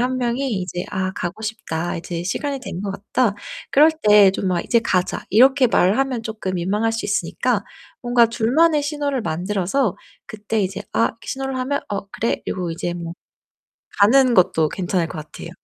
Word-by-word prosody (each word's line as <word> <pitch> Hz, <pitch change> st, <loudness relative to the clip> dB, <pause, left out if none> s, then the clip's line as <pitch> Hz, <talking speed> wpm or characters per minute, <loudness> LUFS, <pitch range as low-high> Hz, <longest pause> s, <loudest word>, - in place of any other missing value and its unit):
1 255 Hz, +1 st, 0 dB
명이 250 Hz, +2 st, -1 dB
이제 180 Hz, 0 st, -4 dB
'아 190 Hz, -1 st, -1 dB
가고 180 Hz, +5 st, -5 dB
싶다. 175 Hz, -6 st, -3 dB
이제 170 Hz, 0 st, -5 dB
시간이 275 Hz, -, -3 dB
된 190 Hz, -7 st, -6 dB
것 200 Hz, -, -3 dB
같다.' 205 Hz, +3 st, 0 dB, 0.4 s
그럴 300 Hz, +3 st, +6 dB
때 210 Hz, -2 st, +7 dB
좀 190 Hz, 0 st, -2 dB
막 180 Hz, -2 st, +1 dB
"이제 235 Hz, -, +3 dB
가자." 185 Hz, -4 st, -1 dB
이렇게 260 Hz, +4 st, +5 dB
말하면 235 Hz, +4 st, +1 dB
쪼끔 215 Hz, -4 st, -4 dB
민망할 205 Hz, +6 st, 0 dB
수 225 Hz, -, -3 dB
있으니까 -, -, -1 dB, 0.4 s
뭔가 240 Hz, -1 st, +4 dB
둘만의 285 Hz, +8 st, +2 dB
신호를 290 Hz, -2 st, -2 dB
만들어서 190 Hz, +7 st, -1 dB, 0.3 s
그때 215 Hz, +1 st, -3 dB
이제 190 Hz, 0 st, -3 dB
'아.' 230 Hz, -, +3 dB
이렇게 230 Hz, -, -9 dB
신호를 270 Hz, -1 st, -3 dB
하면 280 Hz, +3 st, -1 dB
'어, 200 Hz, -1 st, -4 dB
그래.' 230 Hz, -, -2 dB
그리고 180 Hz, -2 st, -3 dB
이제 175 Hz, +1 st, -3 dB
뭐 170 Hz, -1 st, -6 dB, 0.9 s
가는 250 Hz, +4 st, +5 dB
것도 170 Hz, -5 st, +3 dB
괜찮을 180 Hz, 0 st, -1 dB
것 170 Hz, -, -7 dB
같아요. 155 Hz, 0 st, -9 dB
215 Hz, 340 characters per minute, -21 LUFS, 185-255 Hz, 0.9 s, 때